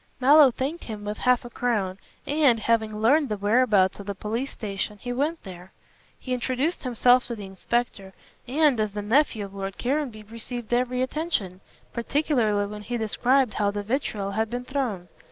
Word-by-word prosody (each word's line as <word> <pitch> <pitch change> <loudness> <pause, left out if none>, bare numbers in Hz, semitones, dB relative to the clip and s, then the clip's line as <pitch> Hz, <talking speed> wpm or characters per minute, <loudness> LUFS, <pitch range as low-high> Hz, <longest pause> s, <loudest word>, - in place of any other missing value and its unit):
Mallow 285 +2 +7
thanked 275 +7 -4
him 210 -2 -7
with 210 +1 -4
half 250 -1 +2
a - - -7
crown 205 -7 -1 0.3
and, 285 -6 +3
having 220 -1 +1
learned 270 +6 +3
the 210 - -2
whereabouts 205 -2 +3
of 200 - -9
the 200 - -3
police 230 +7 -3
station, 205 -1 -4
he 245 +4 -5
went 300 +6 -1
there. 185 -1 -10 0.5
He 255 - -4
introduced 260 +6 -1
himself 250 0 +3
to 235 - -4
the 205 -3 -8
inspector 195 0 -3 0.3
and, 285 -1 +3
as 215 -2 -1
the 205 0 -4
nephew 225 -1 +2
of 195 - -12
Lord 195 0 -5
Caranby, 255 -4 -2
received 230 +2 -6
every 250 +1 +1
attention, 260 - -2 0.3
particularly 235 -5 +1
when 210 +1 -7
he 240 +4 -3
described 245 +3 +2
how 205 -1 +1
the 205 0 -3
vitriol 210 -4 -2
had 220 +2 -1
been 245 +1 -4
thrown. 250 -10 -3
230 Hz, 175 wpm, -25 LUFS, 205-255 Hz, 0.5 s, Mallow